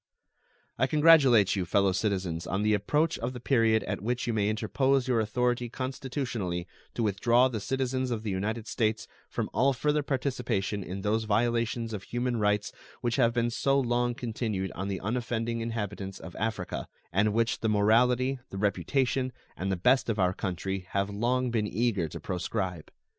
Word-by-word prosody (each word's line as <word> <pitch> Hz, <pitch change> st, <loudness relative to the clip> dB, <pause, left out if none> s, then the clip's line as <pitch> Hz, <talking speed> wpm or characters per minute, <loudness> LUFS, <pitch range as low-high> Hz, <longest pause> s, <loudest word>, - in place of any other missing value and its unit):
I 130 Hz, -, +3 dB
congratulate 140 Hz, -, +6 dB
you, 95 Hz, -, 0 dB
fellow 95 Hz, +2 st, +2 dB
citizens, 95 Hz, -4 st, -1 dB
on 95 Hz, +3 st, -1 dB
the 105 Hz, 0 st, +3 dB
approach 150 Hz, -, +1 dB
of 120 Hz, +3 st, -3 dB
the 125 Hz, -, -7 dB
period 115 Hz, -4 st, +3 dB
at -, -, -4 dB
which 120 Hz, +3 st, -1 dB
you 120 Hz, -, -1 dB
may 105 Hz, -1 st, +1 dB
interpose 130 Hz, +5 st, +1 dB
your 125 Hz, -3 st, +2 dB
authority 120 Hz, +2 st, 0 dB
constitutionally 125 Hz, -, -3 dB, 0.3 s
to 120 Hz, -, 0 dB
withdraw 115 Hz, +5 st, +3 dB
the 120 Hz, -4 st, -3 dB
citizens 130 Hz, +2 st, -1 dB
of 115 Hz, -3 st, -2 dB
the 105 Hz, -, -2 dB
United 105 Hz, +4 st, -2 dB
States 110 Hz, -2 st, -1 dB, 0.2 s
from -, -, -2 dB
all 135 Hz, +2 st, +3 dB
further 150 Hz, +3 st, +1 dB
participation 125 Hz, -7 st, -1 dB
in 95 Hz, +2 st, -6 dB
those 110 Hz, +2 st, 0 dB
violations 115 Hz, +1 st, 0 dB
of 105 Hz, -, -4 dB
human 120 Hz, +3 st, -2 dB
rights 105 Hz, -1 st, +1 dB, 0.3 s
which 120 Hz, -1 st, 0 dB
have 120 Hz, -3 st, +4 dB
been 120 Hz, 0 st, +1 dB
so 135 Hz, +3 st, +2 dB
long 120 Hz, -1 st, +1 dB
continued 110 Hz, -6 st, -3 dB
on 95 Hz, +2 st, -4 dB
the 95 Hz, -2 st, -2 dB
unoffending 115 Hz, +2 st, -2 dB
inhabitants 105 Hz, -4 st, -4 dB
of 85 Hz, +1 st, -10 dB
Africa, 110 Hz, -5 st, -3 dB, 0.3 s
and 105 Hz, +3 st, +3 dB
which 115 Hz, +2 st, +1 dB
the 110 Hz, -, 0 dB
morality, 125 Hz, +5 st, +3 dB
the 95 Hz, -, -7 dB
reputation, 125 Hz, -, 0 dB, 0.2 s
and 95 Hz, +1 st, -2 dB
the -, -, +1 dB
best 125 Hz, +8 st, +3 dB
of 110 Hz, -, 0 dB
our 90 Hz, -2 st, +2 dB
country 95 Hz, 0 st, -3 dB
have 100 Hz, +1 st, 0 dB
long 120 Hz, +4 st, 0 dB
been 110 Hz, -3 st, 0 dB
eager 105 Hz, -5 st, 0 dB
to -, -, -7 dB
proscribe. 90 Hz, -2 st, -3 dB
115 Hz, 175 wpm, -29 LUFS, 100-125 Hz, 0.3 s, congratulate